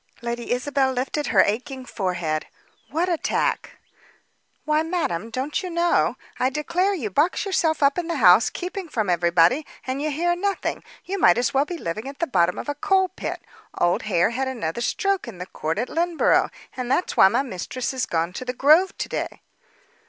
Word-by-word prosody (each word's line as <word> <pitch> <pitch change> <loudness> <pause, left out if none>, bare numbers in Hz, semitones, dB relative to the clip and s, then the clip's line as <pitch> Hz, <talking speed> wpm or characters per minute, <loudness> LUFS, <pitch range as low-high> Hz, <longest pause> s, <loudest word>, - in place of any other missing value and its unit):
Lady 235 0 -4
Isabel 265 +2 +1
lifted 270 +4 -2
her 200 - +5
aching 255 +5 -3
forehead. 180 -9 -2 0.4
"What 335 +4 0
attack?" 340 -3 -1 0.9
"Why, 305 0 +2
madame, 315 - -2
don't 265 +9 -2
you 370 - -5
know. 340 0 +1 0.2
I 255 - +2
declare 340 +8 0
you 230 - -4
box 310 - +1
yourself 320 -6 +1
up 280 +4 +3
in 345 - -4
the 340 - -2
house, 215 -5 +6
keeping 365 0 -6
from 215 -9 0
everybody, 175 - +3 0.2
and 265 +2 -3
you 305 - -1
hear 345 +4 0
nothing. 395 +2 -2 0.2
You 390 +2 -3
might 175 - +5
as 250 +3 0
well 275 +2 +3
be 350 +3 -5
living 215 - -4
at 275 - -10
the 335 - 0
bottom 180 - +1
of - - -6
a 290 - -1
coal 380 +5 +2
pit. 375 - -6 0.3
Old 175 0 +2
Hare 175 +2 +3
had 260 +3 -2
another 235 -6 -3
stroke 390 +7 0
in 220 -6 -8
the 180 - -6
court 160 -2 -3
at 240 +4 -1
Lynneborough, 340 0 +2 0.3
and 250 -1 -4
that's 275 +8 0
why - - +8
my 240 +7 +1
mistress 255 +3 -4
is 260 -2 -2
gone 165 +1 -1
to 255 - -5
the 250 0 -3
Grove 310 +9 +4
to - - -3
day." - - -4
265 Hz, 190 wpm, -23 LUFS, 215-335 Hz, 0.9 s, why